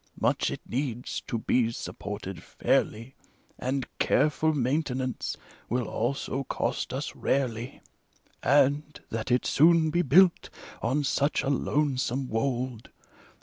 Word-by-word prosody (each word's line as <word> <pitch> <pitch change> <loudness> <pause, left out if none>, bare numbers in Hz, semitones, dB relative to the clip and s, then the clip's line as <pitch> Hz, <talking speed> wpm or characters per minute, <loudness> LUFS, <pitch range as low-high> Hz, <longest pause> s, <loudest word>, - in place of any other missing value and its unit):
Much - - +2
it - - -5
needs, 125 -1 -3
to 130 -5 -1
be 115 +1 +1
supported 100 -5 -6
fairly, 115 +5 0 0.5
And 130 0 -1
careful 155 +1 +3
maintenance 130 -2 -1 0.3
will 125 0 0
also 135 +3 -2
cost - - -2
us - - -4
rarely: 125 -2 -1 0.6
And, 145 +2 +2
that 110 +2 -3
it 125 0 +2
soon 160 +1 +5
be 175 - +2
built, 175 +4 +5 0.3
on 135 +6 +1
such 140 +2 +1
a 140 - +1
lonesome 135 -2 0
wold. 120 0 -2
130 Hz, 115 wpm, -28 LUFS, 120-145 Hz, 0.6 s, soon